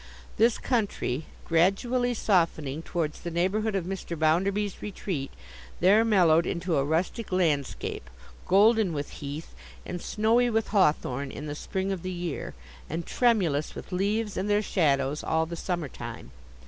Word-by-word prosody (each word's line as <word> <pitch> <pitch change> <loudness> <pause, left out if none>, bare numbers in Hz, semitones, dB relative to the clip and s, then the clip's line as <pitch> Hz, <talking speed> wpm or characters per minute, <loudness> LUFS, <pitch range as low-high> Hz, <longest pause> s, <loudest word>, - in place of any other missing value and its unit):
This 230 +2 +4
country, 200 - -1 0.2
gradually 235 +9 +2
softening 165 -8 +1
towards 165 -3 -3
the 170 - -4
neighbourhood 195 +5 0
of 190 -3 -1
Mr. 180 -2 -5
Bounderby's 190 +6 +1
retreat, 185 -8 -4 0.5
there 200 +5 +5
mellowed 175 -7 +4
into 170 -2 -1
a 135 - +2
rustic 170 - -1
landscape, 150 - -1 0.4
golden 210 -1 +4
with 145 -1 -4
heath, 145 +3 -7 0.3
and 180 -1 -5
snowy 230 +3 +2
with 225 -1 0
hawthorn 140 - +1
in 145 - -7
the 145 - -4
spring 190 +5 -3
of 190 -3 -3
the 185 - -4
year, 175 -4 -4 0.3
and 165 +2 -3
tremulous 185 - +1
with - - -9
leaves 205 +3 -1
and 200 - -1
their 205 +1 +3
shadows 145 -6 +1
all 160 0 +1
the 170 +1 -6
summer 175 -3 -2
time. 65 - -8
180 Hz, 145 wpm, -27 LUFS, 155-210 Hz, 0.5 s, there